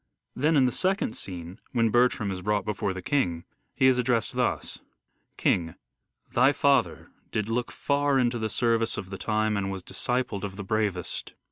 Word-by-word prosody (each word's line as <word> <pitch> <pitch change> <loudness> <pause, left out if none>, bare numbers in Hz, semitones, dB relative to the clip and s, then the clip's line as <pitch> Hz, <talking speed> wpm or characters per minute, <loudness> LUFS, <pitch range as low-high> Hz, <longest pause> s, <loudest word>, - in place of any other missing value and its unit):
Then 155 +5 +2
in 135 - +5
the 125 - +2
second 190 - 0
scene 90 -1 -7
when 115 -3 +2
Bertram 120 -4 +2
is 90 -1 -4
brought 105 0 0
before 105 -2 -1
the 95 -1 -6
king, 90 - 0 0.3
he 130 - +3
is 130 -1 +5
addressed 120 -3 +1
thus: - - -1 0.6
King: 80 -3 +1 0.6
Thy 130 +4 +5
father.... 140 0 +2 0.2
did 105 -1 -1
look 120 +1 -1
far 140 -1 +1
Into 120 -2 +1
the 110 0 -1
service 115 0 +1
of 95 -1 -6
the 95 - -6
time 110 -1 0
and 100 -1 -1
was 95 -2 -5
Discipled 120 -1 -1
of 100 -2 -4
the 100 - -6
bravest. 100 -3 -2
110 Hz, 175 wpm, -27 LUFS, 95-125 Hz, 0.6 s, in